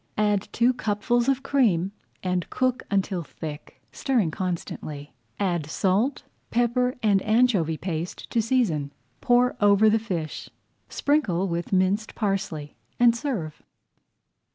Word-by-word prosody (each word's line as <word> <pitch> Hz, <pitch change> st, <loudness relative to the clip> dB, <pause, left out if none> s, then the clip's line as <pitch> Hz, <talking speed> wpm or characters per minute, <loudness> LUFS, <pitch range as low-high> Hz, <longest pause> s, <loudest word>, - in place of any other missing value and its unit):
Add 210 Hz, -2 st, +1 dB
two 240 Hz, +2 st, +3 dB
cupfuls 235 Hz, +3 st, 0 dB
of 270 Hz, -1 st, +1 dB
cream 210 Hz, -11 st, +2 dB, 0.3 s
and 180 Hz, -2 st, -1 dB
cook 255 Hz, 0 st, 0 dB
until 195 Hz, -2 st, 0 dB
thick, 150 Hz, -1 st, -9 dB
stirring 235 Hz, -, 0 dB
constantly. 155 Hz, -5 st, -5 dB, 0.3 s
Add 175 Hz, -6 st, 0 dB
salt, 200 Hz, -, 0 dB, 0.3 s
pepper, 245 Hz, +2 st, +1 dB
and 200 Hz, -3 st, +4 dB
anchovy 215 Hz, -8 st, +2 dB
paste 170 Hz, -1 st, -4 dB
to 230 Hz, -, +2 dB
season, 210 Hz, -, 0 dB, 0.3 s
pour 245 Hz, 0 st, +3 dB
over 205 Hz, +1 st, +5 dB
the 225 Hz, -, +3 dB
fish. 175 Hz, -8 st, -4 dB, 0.4 s
sprinkle 200 Hz, -, +1 dB
with 170 Hz, -1 st, -3 dB
minced 195 Hz, +3 st, +1 dB
parsley, 195 Hz, -8 st, -2 dB, 0.2 s
and 240 Hz, -1 st, +6 dB
serve. 230 Hz, -, -4 dB
200 Hz, 120 wpm, -25 LUFS, 175-240 Hz, 0.4 s, and